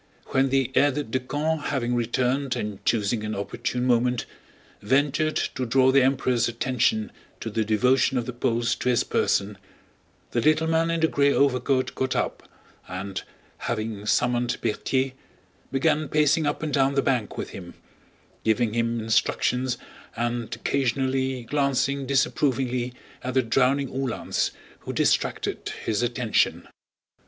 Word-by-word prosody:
When 135 Hz, 0 st, +2 dB
the 135 Hz, -1 st, +1 dB
aide 145 Hz, -2 st, +2 dB
de 130 Hz, -, +1 dB
camp, 150 Hz, +4 st, -2 dB
having 125 Hz, -3 st, -1 dB
returned 125 Hz, +3 st, 0 dB
and 105 Hz, -2 st, -5 dB
choosing 110 Hz, 0 st, +1 dB
an 110 Hz, 0 st, -3 dB
opportune 125 Hz, +5 st, -3 dB
moment, 125 Hz, -1 st, +2 dB, 0.6 s
ventured 145 Hz, +6 st, +1 dB, 0.2 s
to 130 Hz, -, -3 dB
draw 130 Hz, +2 st, +4 dB
the 135 Hz, 0 st, +5 dB
Emperor's 130 Hz, -2 st, +2 dB
attention 115 Hz, -2 st, 0 dB, 0.3 s
to 115 Hz, -, -5 dB
the 110 Hz, +1 st, 0 dB
devotion 125 Hz, +5 st, +2 dB
of 120 Hz, -, -1 dB
the 125 Hz, -, -5 dB
Poles 120 Hz, -1 st, 0 dB
to 125 Hz, -, -1 dB
his 120 Hz, -, +3 dB
person, 100 Hz, 0 st, 0 dB, 0.7 s
the 120 Hz, -, +1 dB
little 155 Hz, +4 st, +3 dB
man 165 Hz, +1 st, +2 dB
in 165 Hz, -1 st, 0 dB
the 160 Hz, -, +5 dB
gray 140 Hz, -2 st, +3 dB
overcoat 130 Hz, -1 st, +2 dB
got 130 Hz, -1 st, -1 dB
up -, -, -2 dB, 0.4 s
and, 95 Hz, +1 st, -5 dB, 0.5 s
having 110 Hz, -1 st, -3 dB
summoned 120 Hz, +1 st, +1 dB
Berthier, 130 Hz, +4 st, 0 dB, 0.6 s
began 150 Hz, +2 st, +1 dB
pacing 150 Hz, 0 st, +3 dB
up 145 Hz, -, -2 dB
and 155 Hz, -, -2 dB
down 135 Hz, -1 st, +2 dB
the 140 Hz, -, +2 dB
bank 120 Hz, -6 st, 0 dB
with -, -, -4 dB
him, 90 Hz, -2 st, -9 dB, 0.7 s
giving 110 Hz, 0 st, +1 dB
him 115 Hz, 0 st, 0 dB
instructions 120 Hz, +2 st, +1 dB, 0.4 s
and 120 Hz, 0 st, -2 dB
occasionally 130 Hz, +1 st, 0 dB
glancing 140 Hz, +1 st, 0 dB
disapprovingly 130 Hz, -2 st, +1 dB, 0.3 s
at 130 Hz, 0 st, -3 dB
the 130 Hz, -, +4 dB
drowning 135 Hz, +4 st, +2 dB
Uhlans 130 Hz, -2 st, -1 dB, 0.3 s
who -, -, -6 dB
distracted -, -, 0 dB
his 110 Hz, 0 st, 0 dB
attention. 120 Hz, -2 st, 0 dB
125 Hz, 140 wpm, -25 LUFS, 115-135 Hz, 0.7 s, the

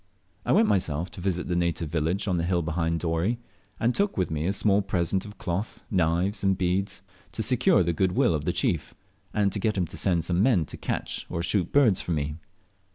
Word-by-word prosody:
I -, -, +2 dB
went -, -, +5 dB
myself 85 Hz, -4 st, 0 dB
to -, -, -9 dB
visit 90 Hz, -1 st, -1 dB
the 90 Hz, -, -1 dB
native 85 Hz, -2 st, 0 dB
village 85 Hz, +6 st, -1 dB
on 90 Hz, -2 st, +1 dB
the 85 Hz, -, 0 dB
hill 85 Hz, 0 st, +1 dB
behind 85 Hz, 0 st, -1 dB
Dorey, 85 Hz, +7 st, 0 dB, 0.4 s
and 120 Hz, +2 st, +2 dB
took 200 Hz, +6 st, 0 dB
with 90 Hz, -3 st, 0 dB
me 80 Hz, +1 st, -1 dB
a -, -, +2 dB
small 100 Hz, 0 st, +2 dB
present 95 Hz, 0 st, -1 dB
of 105 Hz, 0 st, -11 dB
cloth, 95 Hz, +4 st, -4 dB
knives, 90 Hz, +3 st, +1 dB
and 95 Hz, -1 st, +2 dB
beads, 95 Hz, +1 st, -1 dB, 0.3 s
to 110 Hz, -, -1 dB
secure 120 Hz, -4 st, +4 dB
the 85 Hz, 0 st, 0 dB
good 90 Hz, +2 st, +1 dB
will 85 Hz, -, +3 dB
of 75 Hz, -2 st, -2 dB
the -, -, +2 dB
chief, -, -, -1 dB, 0.4 s
and 100 Hz, -2 st, +1 dB
get 105 Hz, +2 st, 0 dB
him 90 Hz, -, +1 dB
to -, -, -6 dB
send 85 Hz, -4 st, +1 dB
some 90 Hz, +1 st, +1 dB
men 105 Hz, -8 st, +3 dB
to -, -, -8 dB
catch -, -, -4 dB
or 85 Hz, -, -3 dB
shoot 90 Hz, 0 st, 0 dB
birds 125 Hz, -10 st, +4 dB
for 90 Hz, -, -2 dB
me. 75 Hz, 0 st, -2 dB
90 Hz, 220 wpm, -26 LUFS, 85-100 Hz, 0.4 s, went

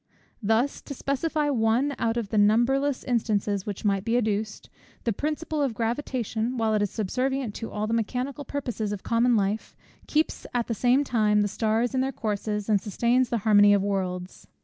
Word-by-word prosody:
Thus, 225 Hz, +6 st, +1 dB
to 280 Hz, -, -8 dB
specify 290 Hz, +3 st, -1 dB
one 240 Hz, +3 st, +2 dB
out 230 Hz, 0 st, 0 dB
of 225 Hz, -4 st, -2 dB
the 215 Hz, -, -1 dB
numberless 250 Hz, +6 st, +3 dB
instances 210 Hz, -5 st, 0 dB
which 205 Hz, 0 st, -5 dB
might 195 Hz, -2 st, +1 dB
be 230 Hz, +2 st, +1 dB
adduced; 215 Hz, -2 st, -2 dB, 0.4 s
the 230 Hz, -, 0 dB
principle 305 Hz, +4 st, -2 dB
of 265 Hz, -5 st, 0 dB
gravitation, 235 Hz, 0 st, -2 dB
while 225 Hz, -1 st, +1 dB
it 210 Hz, -, +2 dB
is 205 Hz, -, +1 dB
subservient 255 Hz, +3 st, -2 dB
to 225 Hz, -, -5 dB
all 210 Hz, 0 st, -3 dB
the 220 Hz, -, -2 dB
mechanical 250 Hz, +5 st, -2 dB
purposes 245 Hz, -7 st, -3 dB
of 205 Hz, -2 st, -5 dB
common 235 Hz, +1 st, +2 dB
life, 205 Hz, +1 st, -1 dB, 0.3 s
keeps 310 Hz, +1 st, 0 dB
at 240 Hz, -1 st, +1 dB
the 230 Hz, -, -2 dB
same 250 Hz, +5 st, +3 dB
time 215 Hz, -5 st, +2 dB
the 205 Hz, -, +2 dB
stars 225 Hz, +4 st, 0 dB
in 260 Hz, -, +1 dB
their 265 Hz, +1 st, 0 dB
courses, 210 Hz, -3 st, -3 dB
and 210 Hz, -3 st, +3 dB
sustains 235 Hz, +5 st, +1 dB
the 235 Hz, -, 0 dB
harmony 205 Hz, -1 st, +6 dB
of 200 Hz, -, +1 dB
worlds. 185 Hz, -2 st, -3 dB
225 Hz, 185 wpm, -26 LUFS, 210-255 Hz, 0.4 s, harmony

